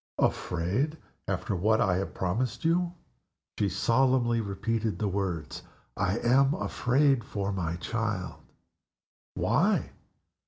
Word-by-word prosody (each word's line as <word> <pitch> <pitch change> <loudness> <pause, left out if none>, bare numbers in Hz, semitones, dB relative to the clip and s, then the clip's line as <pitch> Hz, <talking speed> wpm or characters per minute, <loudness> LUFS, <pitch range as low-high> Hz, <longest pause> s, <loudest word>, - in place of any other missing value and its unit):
"Afraid? 100 - 0 0.3
After 100 - -1
what 110 +5 +2
I 90 -3 +2
have 95 - -4
promised 110 - -2
you?" 175 +1 +2 0.6
She 100 - +2
solemnly 120 +4 +2
repeated 110 +2 -2
the 105 - -1
words, 90 -5 -3 0.3
"I 95 +3 0
am 135 +5 +3
afraid 135 - +2
for 100 -2 -3
my 85 -4 -2
child." 105 +1 -3 0.9
"Why?" - - +2
110 Hz, 110 wpm, -28 LUFS, 95-130 Hz, 0.9 s, am